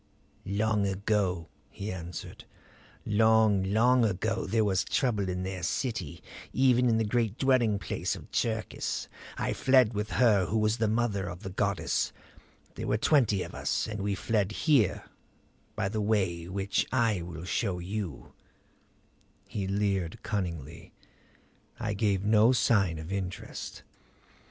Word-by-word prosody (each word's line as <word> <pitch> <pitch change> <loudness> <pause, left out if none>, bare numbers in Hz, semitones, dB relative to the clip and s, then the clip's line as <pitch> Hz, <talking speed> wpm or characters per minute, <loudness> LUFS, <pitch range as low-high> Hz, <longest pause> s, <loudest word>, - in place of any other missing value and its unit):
"Long 105 +1 +1
ago," 95 -3 0 0.2
he 100 +2 -6
answered; 90 -2 -7 0.6
"long, 110 -1 +4
long 115 +6 +3
ago 110 +2 0
there 110 +3 +2
was 95 -3 +2
trouble 105 -7 0
in 90 0 -2
their 95 -1 -4
city, 85 - -3 0.3
even 125 -2 +4
in 115 - +3
the 110 - +2
great 115 0 0
dwelling 125 -6 +3
place - - -2
of - - -12
Cherkis. 110 -2 -2 0.3
I - - -1
fled 130 -4 +4
with 105 +1 -2
her 105 -7 +4
who 110 - 0
was 110 +1 +2
the 110 - +1
mother 105 -4 0
of 90 +3 -9
the 95 - -5
goddess. - - 0 0.6
There - - -5
were 105 - +2
twenty 110 -7 +3
of - - -9
us; - - -1
and 105 -2 -5
we 100 0 -1
fled 105 -1 0
here 140 - +3 0.7
by - - 0
the 105 +2 -2
way 95 -6 0
which 95 +2 -1
I 115 -7 +2
will 85 0 -7
show 95 -1 -1
you 90 -3 -5 0.6
" - - -37
He 100 -2 -3
leered 100 0 -1
cunningly; 85 -7 -4 0.9
I 105 - -2
gave 100 -2 +1
no 110 +3 +5
sign 100 -9 +2
of 80 +3 -7
interest. 95 -2 -5
105 Hz, 145 wpm, -29 LUFS, 95-110 Hz, 0.9 s, no